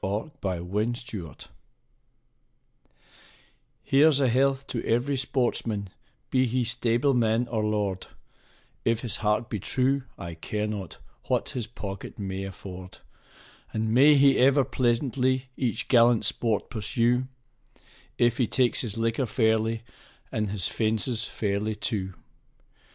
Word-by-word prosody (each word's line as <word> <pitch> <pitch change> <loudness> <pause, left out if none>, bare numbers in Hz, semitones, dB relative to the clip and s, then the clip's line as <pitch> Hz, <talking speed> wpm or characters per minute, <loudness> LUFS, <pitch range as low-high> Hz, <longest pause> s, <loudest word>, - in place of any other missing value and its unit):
A 105 +10 -2
Hunting 100 +5 -1
Song 100 - -7 2.5
Here's 145 +1 +4
a 135 -3 +3
health 135 +2 +2
to 115 - -4
every 125 +5 +1
sportsman, 120 -6 -1 0.4
be 130 -1 +3
he 125 +2 0
stableman 120 0 +2
or 110 -2 -1
lord, 105 -3 -1 0.8
If 115 0 +1
his 120 - -3
heart 105 +2 0
be 105 - -4
true, 135 +6 +1 0.2
I 85 -1 -6
care 105 +6 -3
not 100 -6 -5 0.3
what - - 0
his 120 -4 -4
pocket 100 -4 -7
may 95 -1 -4
afford; 95 -1 -9 0.8
And 110 0 0
may 145 +5 +7
he 140 -1 +5
ever 135 +1 +5
pleasantly 130 +1 0
each 120 -4 -2
gallant 120 -3 +5
sport 110 0 0
pursue, 120 +3 +1 0.9
If 120 +1 +2
he 120 - +3
takes 125 0 +2
his 115 -3 -4
liquor 115 +3 0
fairly, 110 0 +1 0.5
and 105 -2 -1
his 100 -2 0
fences 110 +1 0
fairly, 105 +1 -2
too. 95 -3 -3
115 Hz, 125 wpm, -27 LUFS, 105-125 Hz, 2.5 s, may